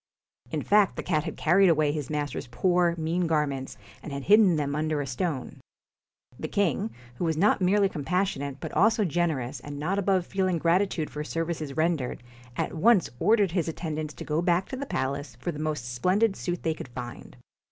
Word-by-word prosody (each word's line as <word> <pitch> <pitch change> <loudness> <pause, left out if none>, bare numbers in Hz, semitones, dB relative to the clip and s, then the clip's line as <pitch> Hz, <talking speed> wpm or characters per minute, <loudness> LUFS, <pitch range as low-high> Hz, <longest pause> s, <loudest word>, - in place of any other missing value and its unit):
In - - -2
fact 205 -1 +4
the - - -4
cat 155 -4 0
had - - -5
carried 185 +4 +4
away 155 -2 +3
his 150 -2 -4
master's 145 -3 -3
poor, 175 +6 +2
mean 165 +2 0
garments, 145 -4 -1 0.2
and 155 - -8
had 140 0 -4
hidden 205 -1 +6
them 145 -2 -1
under 155 0 0
a 145 - -2
stone. 135 +1 -3 0.8
The 155 - -3
king, 170 - 0 0.3
who - - -3
was 160 -2 0
not 200 +3 +3
merely 195 +2 +4
compassionate, 145 -4 -2
but - - -6
also 220 +5 +3
generous 150 -7 -1
and 145 +3 -8
not 180 +7 -1
above 190 -2 +1
feeling 185 -2 0
gratitude 170 -1 +1
for 150 - -4
services 160 -3 -3
rendered, 155 -7 0 0.3
at - - -1
once 195 +3 +3
ordered 205 0 +3
his 175 -2 0
attendants 155 -2 -4
to - - -8
go 155 +2 0
back 175 +1 +1
to - - -4
the 275 +2 -5
palace 140 - -3
for 175 - -2
the 150 - -8
most 150 -6 -3
splendid 195 - +2
suit 175 -1 -4
they 160 - +1
could 155 - -8
find. 120 -1 -8
165 Hz, 190 wpm, -27 LUFS, 145-185 Hz, 0.8 s, hidden